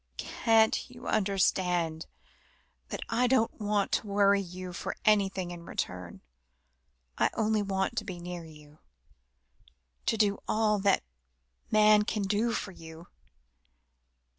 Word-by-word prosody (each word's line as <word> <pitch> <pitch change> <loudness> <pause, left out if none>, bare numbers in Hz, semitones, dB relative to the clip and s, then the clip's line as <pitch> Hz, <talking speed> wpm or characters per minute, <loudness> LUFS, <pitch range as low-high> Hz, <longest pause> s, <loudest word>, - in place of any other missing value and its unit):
"Can't 225 0 +2
you 245 0 -12
understand 180 -5 +1 0.8
that - - -5
I 250 +1 +2
don't 245 -3 +2
want 205 -1 0
to - - 0
worry 200 0 +3
you 180 0 -7
for - - -4
anything 195 -4 +2
in 175 -1 -8
return. 90 - -5 1.0
I - - +4
only 220 -1 +1
want 195 +3 -1
to - - -9
be 185 -4 -7
near 175 0 -6
you, 150 -1 -15 1.3
to 225 - +2
do 205 -2 +2
all 215 -1 +2
that 195 0 +2 0.7
man 215 0 +6
can 210 0 -2
do 210 +4 +1
for 205 - -3
you." 165 -1 -12
200 Hz, 125 wpm, -29 LUFS, 175-215 Hz, 1.3 s, man